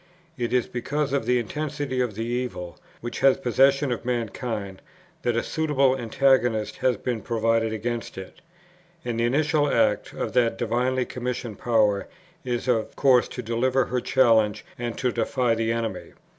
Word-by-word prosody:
It 120 -4 -3
is 125 -1 +2
because 140 +4 -2
of 135 -5 0
the 125 0 +3
intensity 140 +2 -2
of 120 -5 -2
the 115 +2 -3
evil 120 -8 -4 0.2
which 120 - -5
has 135 -1 +5
possession 135 +2 +3
of 120 - -3
mankind, 115 -5 -3 0.4
that 120 -2 0
a 115 - +1
suitable 140 -4 +1
antagonist 120 -2 +1
has 125 -4 +1
been 120 -1 -3
provided 115 0 +1
against 115 +1 -4
it; 95 -1 -9 0.6
and 115 -1 -2
the 115 - +2
initial 145 +3 +2
act - - +1
of - - -4
that 120 -2 +2
divinely 125 +2 0
commissioned 125 -4 -5
power 105 -4 +2 0.4
is 125 -1 -3
of 115 -3 0
course 130 -3 +4
to 125 - -7
deliver 125 +3 +1
her 125 0 -2
challenge 110 -5 +3
and 120 -1 -4
to 125 - 0
defy 120 +1 0
the 115 0 0
enemy. 115 -5 -3
120 Hz, 160 wpm, -25 LUFS, 115-130 Hz, 0.6 s, has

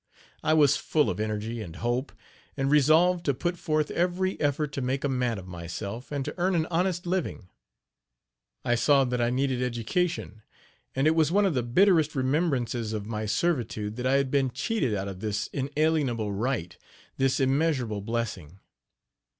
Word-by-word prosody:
I 155 - +2
was 145 -2 +5
full 150 -2 +1
of 90 - -5
energy 110 +2 -3
and 85 -6 -8
hope, 120 +6 -2 0.5
and 135 0 0
resolved 160 +5 +4
to 140 - +1
put 175 +6 -1
forth 155 -3 -1
every 180 +2 0
effort 145 0 0
to 140 - -4
make 130 +2 -1
a - - +2
man 125 -4 0
of 95 - -8
myself, 95 - -6
and 140 -2 -2
to - - -4
earn 185 +1 +2
an 160 -2 +2
honest 175 +1 0
living. 175 - -2 1.2
I 120 - +2
saw 135 +4 +4
that 125 -1 -1
I 120 - +2
needed 130 0 0
education; 125 - -2 0.5
and 135 +2 +1
it 155 - +5
was 160 -1 +2
one 205 +2 +4
of 190 - +2
the 125 - +1
bitterest 155 - +3
remembrances 130 -5 0
of 105 -2 -3
my 110 0 -3
servitude 110 -5 -1
that 125 +1 -1
I 130 - +2
had 140 -1 +2
been 135 -2 +2
cheated 135 - -1
out 100 0 -3
of 95 -2 -7
this 105 0 -2
inalienable 140 -6 0
right 110 -4 -2 0.4
this 135 0 +2
immeasurable 135 -6 +1
blessing. 105 -7 -4
130 Hz, 175 wpm, -27 LUFS, 115-155 Hz, 1.2 s, was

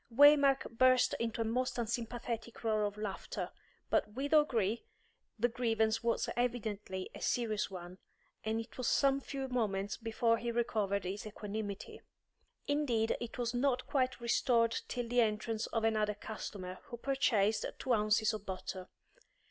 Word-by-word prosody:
Waymark 275 -2 +5
burst 255 -1 +5
into 230 0 -1
a - - +1
most 250 +3 0
unsympathetic 235 0 -3
roar 215 -2 +2
of 205 0 -4
laughter, 210 -2 -4 0.4
but - - +2
with 280 +5 -2
O'Gree 235 -8 +3 0.5
the 235 +2 +3
grievance 225 -2 +1
was 235 0 +1
evidently 215 -6 -2
a - - -9
serious 215 -3 0
one, 180 -1 -8 0.4
and 220 +1 0
it 230 +3 -8
was 250 - -1
some 275 -1 +3
few 270 -1 -4
moments 205 -6 -1
before 230 0 +1
he 235 0 -2
recovered 215 -4 0
his 195 +3 -4
equanimity. 205 -1 -5 0.6
Indeed 260 -7 +1
it 235 -1 -6
was 240 -1 -1
not 255 0 +1
quite 260 -2 0
restored 235 -1 +2
till 245 -1 -3
the 245 +1 +3
entrance 220 0 0
of 225 - -1
another 215 -2 +2
customer, 195 -3 -6
who 260 -5 -7
purchased 225 -5 +2
two 255 - 0
ounces 215 0 +3
of 215 -2 -5
butter. 185 -1 -5
230 Hz, 150 wpm, -34 LUFS, 210-245 Hz, 0.6 s, Waymark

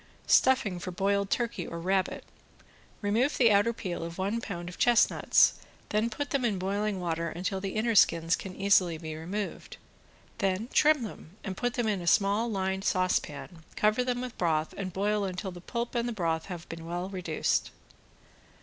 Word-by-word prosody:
~STUFFING 215 -9 +3
FOR 185 - -5
BOILED 200 +2 0
TURKEY 235 -8 -1
OR 170 - -6
RABBIT~ 190 +2 0 0.8
Remove 230 +8 +1
the 235 -4 +5
outer 205 +3 +4
peel 185 -7 -5
of 170 0 -6
one 200 +5 -1
pound 175 -6 -6
of 180 - -9
chestnuts, 240 -1 +4 0.3
then 215 +2 +1
put 285 +6 -4
them 275 -2 +1
in 215 -5 +1
boiling 200 +2 -1
water 170 -1 -2
until 190 +2 -3
the 195 -1 -4
inner 230 +2 +1
skins 165 -4 +4
can 185 -2 -8
easily 185 -4 +3
be 155 -1 -6
removed, 190 +6 -5 0.6
then 195 +4 0
trim 300 -3 +4
them 200 -4 -9
and 190 -2 -4
put 245 +3 -2
them 240 -3 0
into 190 -5 -1
small 205 +6 +3
lined 190 -2 -1
saucepan, 180 -4 -1
cover 215 +4 +2
them 250 -1 -1
with 250 -2 -6
broth 160 -3 0
and 190 -2 -4
boil 205 +3 0
until 190 0 -4
the 175 0 -10
pulp 235 +5 -4
and 240 0 0
the - - -3
broth 165 -5 -1
has 175 -3 -7
been 165 0 -8
well 175 +2 -3
reduced. 180 -5 -1
195 Hz, 175 wpm, -29 LUFS, 175-220 Hz, 0.8 s, the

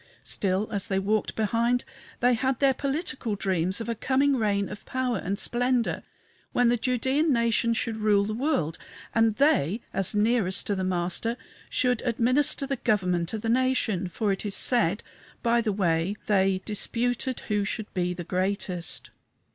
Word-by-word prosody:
Still, 195 +1 -1
as 200 -3 -2
they 190 - 0
walked 205 +2 0
behind, 235 +3 +1 0.4
they 245 +1 +4
had 260 +2 0
their 275 -1 +4
political 270 - -3
dreams 185 -1 -1
of 230 - -5
a 235 - 0
coming 270 +4 +2
reign 205 -4 0
of - - -9
power 255 -5 -1
and 195 +3 -3
splendor, 245 +1 +1 0.5
when 245 -1 +3
the 240 - +2
Judæan 260 +5 +1
nation 235 -2 +2
should 225 -1 -2
rule 210 -2 +3
the 215 - -3
world, 215 - -1 0.3
and 225 -1 +3
they, 215 - +2
as 195 +1 0
nearest 210 -3 +2
to 205 - 0
the 190 - -2
Master, 185 +6 -1 0.3
should 250 -3 +1
administer 255 +4 +2
the 275 0 -2
government 180 -8 0
of 220 - -3
the 225 - -3
nation 235 -6 +1
for 200 +4 -1
it 195 - -2
is 205 -2 -1
said, 210 -6 +2 0.4
by 235 0 +3
the 220 -2 0
way 180 -1 0
they 190 -2 +2
"disputed 245 +4 -1
who 210 -2 -1
should 210 +1 -4
be 180 -1 0
the 175 - -5
greatest." 185 -1 -3
220 Hz, 165 wpm, -26 LUFS, 195-245 Hz, 0.5 s, they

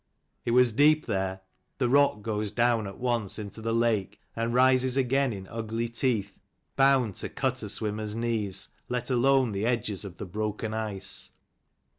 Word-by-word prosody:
It - - -1
was 125 0 +5
deep 150 +6 +4
there: 95 -3 -2 0.4
the 125 - +1
rock 135 -5 +3
goes 105 -1 -2
down 120 -1 +1
at 100 - -9
once 120 -5 0
into 105 +1 -7
the 115 +1 -2
lake, 110 -4 0 0.2
and 115 +1 -1
rises 130 +1 +4
again 135 0 +2
in 95 -3 -6
ugly 115 +2 -3
teeth, 115 -3 -1 0.4
bound 135 -5 +4
to - - -4
cut - - -2
a - - -5
swimmer's 105 0 -2
knees, 110 -5 0 0.2
let 125 +1 -2
alone 130 0 +3
the 100 +2 -1
edges 110 -5 -1
of 95 -3 -9
the 105 - -6
broken 105 +3 -3
ice. 110 -3 -3
115 Hz, 165 wpm, -28 LUFS, 105-125 Hz, 0.4 s, was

